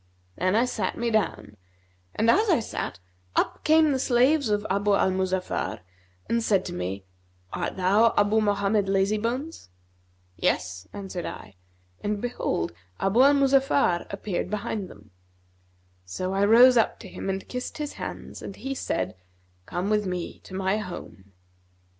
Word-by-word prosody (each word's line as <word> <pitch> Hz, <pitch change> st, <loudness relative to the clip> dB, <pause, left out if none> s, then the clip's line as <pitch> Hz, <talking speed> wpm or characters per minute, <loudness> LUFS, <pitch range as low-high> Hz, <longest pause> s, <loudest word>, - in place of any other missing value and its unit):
Then 185 Hz, +3 st, +1 dB
I 235 Hz, +3 st, +4 dB
sat 250 Hz, -, -2 dB
me 235 Hz, 0 st, -1 dB
down 215 Hz, -2 st, -1 dB, 0.6 s
and 220 Hz, -, +1 dB
as 425 Hz, +3 st, +3 dB
I 335 Hz, -, +4 dB
sat, 220 Hz, -, -4 dB, 0.4 s
up -, -, 0 dB
came 315 Hz, -1 st, +5 dB
the 265 Hz, -, 0 dB
slaves 260 Hz, +2 st, +3 dB
of 205 Hz, 0 st, 0 dB
Abu 200 Hz, +1 st, +2 dB
al 190 Hz, -, +2 dB
Muzaffar 185 Hz, -, -2 dB, 0.5 s
and 230 Hz, 0 st, +1 dB
said 195 Hz, -4 st, +2 dB
to -, -, -5 dB
me, 95 Hz, +2 st, -4 dB, 0.5 s
'Art -, -, -3 dB
thou 205 Hz, +5 st, +4 dB
Abu 205 Hz, +2 st, +4 dB
Mohammed 205 Hz, 0 st, +1 dB
Lazybones?' 215 Hz, -, -1 dB, 0.7 s
'Yes' 90 Hz, +1 st, -1 dB
answered 190 Hz, -3 st, -5 dB
I; 100 Hz, -, -8 dB, 0.5 s
and 205 Hz, 0 st, -1 dB
behold, 200 Hz, -, -2 dB, 0.3 s
Abu 195 Hz, +6 st, +3 dB
al 280 Hz, +2 st, +6 dB
Muzaffar 275 Hz, -9 st, +3 dB
appeared 195 Hz, -2 st, -3 dB
behind 205 Hz, -1 st, -3 dB
them. 105 Hz, 0 st, -16 dB, 0.9 s
So 185 Hz, -, -4 dB
I 195 Hz, +1 st, +3 dB
rose 245 Hz, +4 st, +7 dB
up 225 Hz, -, +2 dB
to 205 Hz, -, -9 dB
him 195 Hz, -, -6 dB
and 195 Hz, 0 st, -3 dB
kissed 250 Hz, 0 st, -5 dB
his 295 Hz, -1 st, -4 dB
hands: -, -, -7 dB
and 195 Hz, -, -7 dB
he 270 Hz, +3 st, -4 dB
said, 95 Hz, -, -2 dB, 0.5 s
'Come 185 Hz, +4 st, -2 dB
with 210 Hz, -2 st, +1 dB
me 180 Hz, -2 st, -4 dB
to 185 Hz, -, -9 dB
my 190 Hz, +2 st, +1 dB
home.' 100 Hz, -, -9 dB
205 Hz, 155 wpm, -26 LUFS, 185-240 Hz, 0.9 s, rose